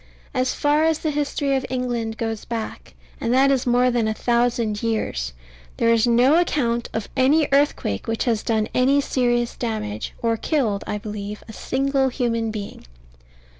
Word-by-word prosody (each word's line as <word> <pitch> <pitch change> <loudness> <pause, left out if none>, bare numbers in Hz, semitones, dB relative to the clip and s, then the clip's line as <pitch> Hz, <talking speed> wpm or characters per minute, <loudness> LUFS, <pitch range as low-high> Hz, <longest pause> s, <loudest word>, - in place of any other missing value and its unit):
As 255 -1 0
far 295 +1 +2
as 320 -1 +3
the 310 -1 -2
history 285 -1 0
of 265 - 0
England 240 -3 -2
goes 225 -1 -3
back, 230 -2 -6 0.2
and 230 - -1
that 275 +1 +5
is 260 -2 0
more 245 +1 +3
than 235 -2 +1
a 220 - -1
thousand 235 -3 0
years, 140 - -1 0.5
there 230 0 +3
is 230 +1 +3
no 250 +7 +5
account 240 -9 0
of 220 -2 -3
any 280 +4 +4
earthquake 275 - +1
which 225 0 -1
has 230 -4 +1
done 220 -2 0
any 270 +3 +3
serious 240 -3 0
damage, 215 - -4
or 230 -1 +1
killed, 220 -7 0
I 210 - -2
believe, 210 -1 -6
a 220 - -9
single 270 +3 0
human 230 -3 -1
being. 210 - -7
240 Hz, 170 wpm, -22 LUFS, 225-270 Hz, 0.5 s, that